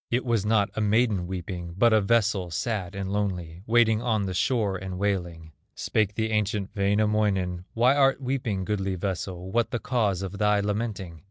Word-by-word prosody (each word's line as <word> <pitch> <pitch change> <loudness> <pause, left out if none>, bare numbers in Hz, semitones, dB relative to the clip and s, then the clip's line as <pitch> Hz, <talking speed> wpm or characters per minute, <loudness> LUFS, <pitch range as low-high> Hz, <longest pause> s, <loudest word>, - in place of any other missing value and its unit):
It 125 +2 0
was 115 -4 0
not 105 -2 +2
a 110 - -1
maiden 105 -3 +2
weeping, 90 -2 -6
But 115 +2 +4
a 110 - +5
vessel, 105 -4 +1
sad, 95 +1 -3
and 95 -1 -4
lonely, 90 -5 -3
Waiting 110 -1 +4
on 110 -4 0
the 95 - -3
shore 105 -1 +1
and 95 -1 -5
wailing. 90 -5 -2 0.2
Spake 105 -1 0
the 110 0 -1
ancient 105 -2 -1
Wainamoinen: 100 -3 +1
"Why 125 +4 +4
art 135 -1 +3
weeping, 125 -8 -2
goodly 95 -2 -1
vessel, 95 0 -4
What 120 +2 +1
the - - -2
cause 105 -7 0
of 95 +1 -6
thy 105 -1 +3
lamenting? 100 -5 -3
100 Hz, 175 wpm, -26 LUFS, 95-110 Hz, 0.2 s, a